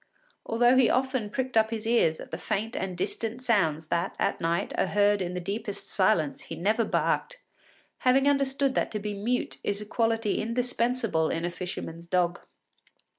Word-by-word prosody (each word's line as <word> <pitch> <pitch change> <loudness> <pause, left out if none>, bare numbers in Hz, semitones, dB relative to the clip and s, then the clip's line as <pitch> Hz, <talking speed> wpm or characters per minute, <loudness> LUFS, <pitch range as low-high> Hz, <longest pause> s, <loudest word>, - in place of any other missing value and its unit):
Although 240 +3 +4
he 260 -3 +5
often 260 -4 0
pricked 255 +3 -3
up 220 0 +4
his 225 -1 -4
ears 225 -9 +2
at - - -10
the - - -3
faint 220 +3 -2
and 185 -2 -3
distant 230 +6 -3
sounds 160 -10 +1
that, 170 +3 -1
at - - -1
night, 165 +1 0
are - - +1
heard 205 +1 +3
in 180 0 -3
the - - -1
deepest 205 +3 -4
silence, 185 -7 +2
he 165 - -7
never 210 +8 +1
barked, - - 0 0.6
having 265 +2 +3
understood 275 -1 +2
that - - 0
to 210 - -1
be 210 0 -4
mute 225 +5 -2
is 200 0 -1
a 210 - -7
quality 225 -1 0
indispensable 235 -6 0
in 165 +1 -2
a 175 - -2
fisherman’s 170 -2 -6
dog. 175 -1 +1
215 Hz, 180 wpm, -27 LUFS, 180-240 Hz, 0.6 s, he